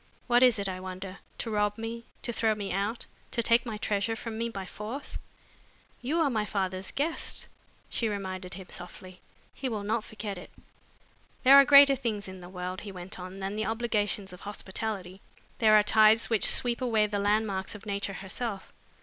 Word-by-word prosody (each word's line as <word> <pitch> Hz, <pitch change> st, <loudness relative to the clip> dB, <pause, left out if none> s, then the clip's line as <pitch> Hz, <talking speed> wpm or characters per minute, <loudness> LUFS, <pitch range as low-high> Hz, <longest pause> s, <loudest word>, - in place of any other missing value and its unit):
What 240 Hz, 0 st, +4 dB
is 250 Hz, -3 st, +6 dB
it, 200 Hz, -1 st, -1 dB
I 185 Hz, -1 st, -4 dB
wonder? 185 Hz, +1 st, -7 dB, 0.2 s
To 230 Hz, -, -3 dB
rob 210 Hz, 0 st, +1 dB
me, 230 Hz, +1 st, -5 dB, 0.2 s
to 235 Hz, -, -2 dB
throw 220 Hz, -1 st, +2 dB
me 205 Hz, -2 st, -4 dB
out, 205 Hz, +5 st, -2 dB, 0.2 s
to 235 Hz, -, 0 dB
take 235 Hz, +2 st, +4 dB
my 220 Hz, -2 st, -3 dB
treasure 210 Hz, +1 st, 0 dB
from 225 Hz, -1 st, -6 dB
me 230 Hz, +1 st, -2 dB
by 195 Hz, -4 st, -6 dB
force?" 215 Hz, +9 st, -6 dB, 0.8 s
"You 295 Hz, +7 st, 0 dB
are 305 Hz, -, +3 dB
my 215 Hz, -3 st, +1 dB
father's 190 Hz, -2 st, -2 dB
guest," 315 Hz, +4 st, -1 dB, 0.4 s
she 230 Hz, -, 0 dB
reminded 185 Hz, -3 st, -5 dB
him 190 Hz, 0 st, -8 dB
softly. 185 Hz, +1 st, -10 dB, 0.3 s
"He 265 Hz, -, -3 dB
will 215 Hz, -3 st, -3 dB
not 220 Hz, +2 st, 0 dB
forget 210 Hz, -3 st, -6 dB
it." -, -, -11 dB, 0.9 s
"There 270 Hz, +1 st, +9 dB
are 280 Hz, 0 st, +9 dB
greater 280 Hz, -1 st, +9 dB
things 220 Hz, -7 st, -3 dB
in 190 Hz, 0 st, -8 dB
the 175 Hz, 0 st, -10 dB
world," 180 Hz, 0 st, -5 dB
he 205 Hz, -, -7 dB
went 185 Hz, +1 st, -7 dB
on, 185 Hz, +1 st, -7 dB
"than 195 Hz, +2 st, -3 dB
the 215 Hz, -, -1 dB
obligations 210 Hz, -4 st, -1 dB
of 180 Hz, -, -11 dB
hospitality. 195 Hz, -2 st, -4 dB, 0.4 s
There 215 Hz, -2 st, +6 dB
are 210 Hz, -, +5 dB
tides 220 Hz, +2 st, +5 dB
which 220 Hz, -, +4 dB
sweep 240 Hz, 0 st, +1 dB
away 225 Hz, -4 st, +3 dB
the 205 Hz, -1 st, -2 dB
landmarks 205 Hz, -1 st, 0 dB
of 210 Hz, -, -11 dB
nature 200 Hz, -1 st, -2 dB
herself. 200 Hz, 0 st, -5 dB
210 Hz, 190 wpm, -29 LUFS, 190-230 Hz, 0.9 s, There